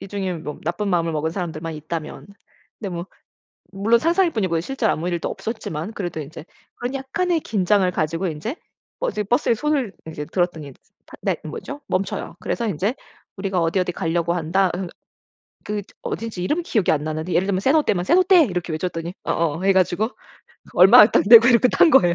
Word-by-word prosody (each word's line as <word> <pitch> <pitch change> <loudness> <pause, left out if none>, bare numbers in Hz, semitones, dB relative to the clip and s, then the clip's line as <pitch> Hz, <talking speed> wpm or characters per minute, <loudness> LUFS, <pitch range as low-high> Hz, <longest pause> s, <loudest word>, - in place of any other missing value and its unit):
이 195 - -9
중에 195 -2 -3
뭐 150 -2 -7
나쁜 175 +5 -2
마음을 170 -3 +1
먹은 155 +1 -1
사람들만 165 -3 -5
있다면 155 +3 -6 0.5
근데 200 - -4
뭐 170 +2 -5 0.7
물론 215 +4 +2
상상일 340 +4 +2
뿐이고 185 - 0
실제로 245 +4 -1
아무 170 +3 -2
일도 170 -1 -2
없었지만 215 -4 -5
그래도 175 -6 -4
인제 155 +2 -8 0.3
그런 245 +2 -4
약간의 320 +6 -1
긴장을 195 -2 +1
가지고 165 +3 -1
인제 165 - -4 0.4
버스 345 - -1
버스에 240 +2 +2
손을 270 -4 -1 0.2
이제 150 -2 -6
들었더니 160 -6 -2 0.3
팟 - - -14
네 - - 0
뭐죠? 285 +1 -7
멈춰요. 190 +1 -3
그래서 235 -2 -2
인제 200 - -1 0.4
우리가 190 -2 -1
어디 165 +3 +1
어디 180 -1 0
가려고 170 +1 -1
한다. 180 +3 +1
읏 180 -1 -4 0.8
그 210 0 -3 0.2
어딘지 225 -6 -5
이름 325 - 0
기억이 215 - +1
안 150 -1 -1
나는데 155 +3 -3
예를 185 - +2
들면 195 -2 0
세노테면 260 - +2
"세노테!" 365 - +5
이렇게 180 -4 -3
외쳤더니 170 +1 -4
어어 165 +1 -1
해 195 0 +4
가지고 190 +4 +1 0.7
얼마 210 +4 +9
딱 - - +2
내고 230 +1 +9
이렇게 245 +1 +5
탄 330 - +4
거예요. 175 -11 +5
190 Hz, 395 characters per minute, -22 LUFS, 170-230 Hz, 0.8 s, 얼마